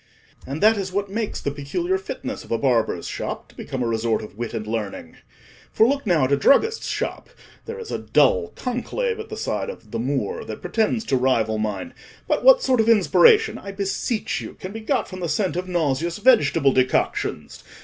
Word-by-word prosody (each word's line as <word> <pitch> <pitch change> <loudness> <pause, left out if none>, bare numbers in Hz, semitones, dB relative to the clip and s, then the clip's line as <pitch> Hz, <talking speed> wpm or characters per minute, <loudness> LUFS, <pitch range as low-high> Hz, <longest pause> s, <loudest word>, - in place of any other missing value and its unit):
And 140 +7 -4
that 220 +1 +6
is 190 -2 -3
what 200 +1 -2
makes 220 0 -3
the 140 - -2
peculiar 340 - -2
fitness 395 - -6
of - - -14
a - - +2
barber's - - 0
shop - - -5
to - - -20
become 140 - -4
a - - -1
resort 115 -1 0
of 105 - -11
wit 120 +1 -5
and 110 -1 -4
learning. 110 -2 -5 0.5
For, 220 - +4
look 280 -2 -1
now 170 -7 +3
at 130 - +1
a 140 - +4
druggist's 440 - +3
shop: - - -3 0.4
there 460 +1 -5
is 460 -2 -8
a - - -2
dull 475 -3 +3
conclave 440 - -2
at 440 0 -7
the - - -6
sign - - -2
of 485 - -10
'The 115 - -3
Moor,' 130 -3 -2
that 110 - -7
pretends 225 0 0
to 135 - +1
rival 115 -4 +1
mine; 110 - -3 0.3
but - - 0
what - - +7
sort 255 -2 +2
of 225 +1 +3
inspiration, 435 - +5
I 200 - -8
beseech 200 +3 -2
you, - - -8
can 185 - -8
be 220 - -6
got 220 - 0
from 185 - -8
the 175 -2 -3
scent 195 -2 0
of 180 +1 -3
nauseous 170 -1 -1
vegetable 165 - +4
decoctions? 130 0 -1
190 Hz, 205 wpm, -23 LUFS, -, 0.5 s, what